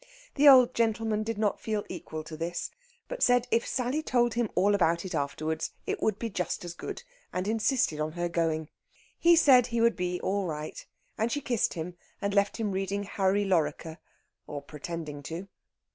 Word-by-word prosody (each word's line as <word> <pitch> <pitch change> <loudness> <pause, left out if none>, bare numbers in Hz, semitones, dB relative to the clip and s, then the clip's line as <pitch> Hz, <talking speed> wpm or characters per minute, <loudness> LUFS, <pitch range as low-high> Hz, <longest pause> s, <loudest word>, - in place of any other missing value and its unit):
The 290 0 +7
old 255 -2 +7
gentleman 225 -1 +1
did 225 0 -3
not 210 -1 0
feel 215 -2 -2
equal 160 -3 -6
to 155 - -8
this, 170 +2 -4 0.4
but - - -6
said 245 0 +4
if 230 - +2
Sally 260 +4 -1
told 240 -5 +2
him 235 -2 0
all 200 +3 +4
about 170 -2 +2
it 185 - -5
afterwards 155 +2 -2
it - - -3
would 215 -3 +1
be 230 - -3
just 180 -4 -3
as 175 - -5
good, 170 - -7 0.3
and 185 +2 -2
insisted 225 - +1
on 155 0 -2
her 175 0 -1
going. 160 -2 -1 0.5
He 340 0 +6
said 260 -7 +6
he 235 -1 -1
would 230 0 +4
be 180 -1 -2
all 195 -1 0
right, 155 -1 -5 0.4
and 225 +2 +1
she 290 - 0
kissed 240 -5 0
him 175 +2 -5 0.2
and 200 -1 -1
left 200 0 +2
him 220 -3 -1
reading 195 +1 -2
"Harry 200 0 +1
Lorrequer," 165 -3 0 0.5
or 145 -1 -6
pretending 150 0 -6
to. 165 +6 -6
195 Hz, 190 wpm, -29 LUFS, 165-230 Hz, 0.5 s, The